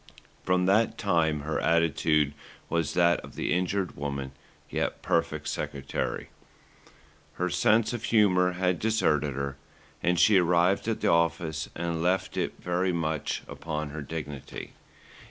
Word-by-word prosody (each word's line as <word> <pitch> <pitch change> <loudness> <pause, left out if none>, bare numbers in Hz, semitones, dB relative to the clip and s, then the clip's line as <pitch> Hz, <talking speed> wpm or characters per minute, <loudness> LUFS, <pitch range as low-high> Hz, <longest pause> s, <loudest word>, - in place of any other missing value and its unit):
From 90 0 +2
that 105 +4 +3
time 80 -6 +1
her 75 +2 -2
attitude 80 -3 +2 0.4
was 85 -3 -1
that 85 -1 +4
of - - -12
the - - -1
injured 90 +1 -1
woman, 70 -2 -4 0.4
yet - - -2
perfect - - 0
secretary. 70 -1 -3 1.0
Her 90 0 -2
sense 110 +5 +3
of 120 -1 -4
humour 90 -5 +4
had 90 0 0
deserted 75 -11 +1
her, 70 0 -3 0.4
and 90 0 +2
she 105 -3 +6
arrived 90 +3 +2
at 115 - -1
the - - +3
office 85 -1 0
and 85 -1 -2
left 90 +2 0
it - - -1
very 90 +1 0
much 80 -3 -2
upon 75 -2 -4
her 75 +1 -5
dignity. 75 -2 -7
85 Hz, 135 wpm, -28 LUFS, 75-90 Hz, 1.0 s, she